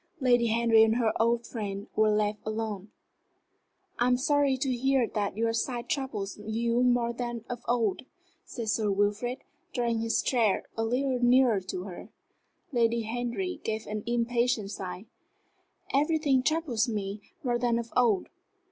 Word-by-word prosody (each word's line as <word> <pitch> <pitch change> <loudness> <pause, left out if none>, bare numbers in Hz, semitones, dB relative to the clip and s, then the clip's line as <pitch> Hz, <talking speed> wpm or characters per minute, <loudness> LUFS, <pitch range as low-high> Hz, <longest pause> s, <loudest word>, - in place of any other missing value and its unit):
Lady 245 -3 +3
Henry 225 0 +5
and 220 0 +3
her 230 -2 +2
old 235 +1 +2
friend 200 -3 -5
were 215 0 +4
left 210 0 +1
alone. 215 -2 -4 1.1
"I 240 - +3
am 250 0 +3
sorry 280 0 +2
to 260 -1 0
hear 265 0 +2
that 205 -2 -2
your 225 0 +1
sight 240 +1 -2
troubles 215 -9 -3
you 230 +3 0
more 245 -1 +2
than 240 -1 -5
of 245 -1 -5
old," 235 -2 0 0.4
said 230 -3 -5
Sir 215 -1 +1
Wilfrid, 205 +6 0 0.3
drawing 235 -2 0
his 225 0 0
chair 230 -6 +2
a 225 - -1
little 250 +3 0
nearer 245 -3 +5
to 185 -1 -5
her. 185 -3 -9 0.6
Lady 235 -2 +2
Henry 245 - -3
gave 220 0 -3
an 210 0 -4
impatient 235 -3 0
sigh. 185 0 -6 0.9
"Everything 290 -2 +3
troubles 265 -6 0
me 205 -1 -3 0.2
more 240 -2 0
than 235 -1 +1
of 235 0 -5
old. 230 -6 +3
235 Hz, 150 wpm, -28 LUFS, 215-245 Hz, 1.1 s, Henry